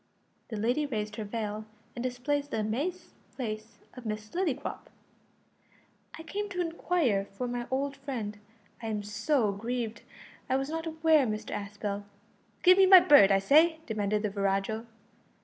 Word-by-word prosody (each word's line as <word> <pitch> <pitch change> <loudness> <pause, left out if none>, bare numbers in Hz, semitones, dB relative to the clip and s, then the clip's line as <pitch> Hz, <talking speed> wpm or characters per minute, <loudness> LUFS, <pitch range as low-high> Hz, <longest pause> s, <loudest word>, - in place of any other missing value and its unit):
The 220 - -4
lady 245 +8 +1
raised 215 -4 -3
her 220 - -3
veil, 210 0 -4 0.3
and 240 - -4
displayed 255 +4 -1
the 255 -6 -2
amazed 285 +13 -3 0.3
face 220 -2 -5 0.2
of 250 - -10
Miss 215 -1 -5
Lillycrop. 315 -6 -2 1.3
"I 325 - -9
came 410 +5 -4
to 365 -2 -5
inquire 330 - +1
for 250 - -2
my 240 0 -4
old 275 +2 -1
friend 235 -7 -5 0.4
I'm 215 -2 -3
so 215 +3 +1
grieved; 230 +2 -4 0.5
I 260 - +2
was 270 +1 -1
not 325 +1 -3
aware 315 -3 +3
Mr 215 0 -4
Aspel 205 0 -4 0.3
" - - -37
"Give 370 +1 +7
me 380 - +7
my 375 -1 +11
bird, 285 - +7
I 195 - +6
say!" 310 - +5
demanded 210 -1 -1
the 210 - -1
virago. 200 +3 -1
240 Hz, 155 wpm, -29 LUFS, 210-295 Hz, 1.3 s, my